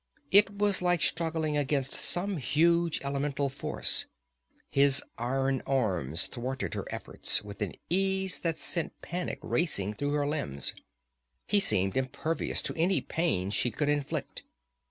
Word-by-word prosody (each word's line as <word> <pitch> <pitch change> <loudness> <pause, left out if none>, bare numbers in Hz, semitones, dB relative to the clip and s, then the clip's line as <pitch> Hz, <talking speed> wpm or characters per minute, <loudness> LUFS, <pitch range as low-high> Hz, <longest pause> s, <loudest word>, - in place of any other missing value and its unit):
It 200 +1 +5
was 205 -2 +2
like 175 -1 +2
struggling 160 0 0
against 140 -2 0
some 190 +2 0
huge 165 +4 +2
elemental 140 0 -1
force; 135 - +1 0.6
his 140 -1 +5 0.2
iron 135 +2 0
arms 95 - 0
thwarted 130 +2 -4
her - - -4
efforts - - 0
with 100 0 -10
an 100 -4 -2
ease 190 +1 0
that 165 -2 -1
sent 170 +1 -3
panic 180 +1 -3
racing 105 - 0
through 145 +6 -2
her 145 -1 +1
limbs. 75 - -1 0.7
He 205 - +3
seemed 95 - +3
impervious 130 +5 -1
to - - -2
any 175 +3 +2
pain 130 - -1
she 115 +4 +1
could 145 +6 -1
inflict. 145 -1 -2
145 Hz, 135 wpm, -29 LUFS, 130-170 Hz, 0.7 s, It